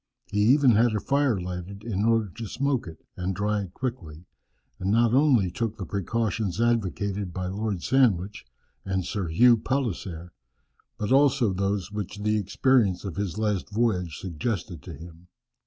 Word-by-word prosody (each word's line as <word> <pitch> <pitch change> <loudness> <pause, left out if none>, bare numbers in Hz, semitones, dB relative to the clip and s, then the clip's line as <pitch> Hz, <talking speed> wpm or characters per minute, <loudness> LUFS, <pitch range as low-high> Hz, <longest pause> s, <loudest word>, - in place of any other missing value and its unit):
He 105 - 0
even 130 +5 +5
had 115 0 +3
a - - +1
fire 140 -3 +1
lighted 90 +3 -6
in 105 -3 -1
order 115 -2 +3
to 110 +5 -8
smoke 135 0 -1
it, 80 - -11
and 95 +1 -3
dry 105 +2 0
it 95 -1 -9
quickly, 90 -11 -5 0.5
and 95 - -2
not 115 +2 +3
only 130 - +4
took 110 +3 -3
the 95 - -5
precautions 100 +1 -2
advocated 100 -4 0
by 90 +1 -4
Lord 100 -1 -3
Sandwich, 105 -7 +2 0.4
and 95 -2 -2
Sir 95 -3 -3
Hugh 115 +9 +5
Palliser, 95 -10 -3 0.7
but 105 +3 -3
also 135 -6 +4
those 100 +1 -1
which 105 -1 -5
the 105 0 +2
experience 105 -1 +2
of 95 - -5
his 100 -3 -3
last 105 -3 -1
voyage 100 -7 0
suggested 90 - -4
to 85 - -9
him. 85 +3 -13
105 Hz, 160 wpm, -26 LUFS, 90-115 Hz, 0.7 s, even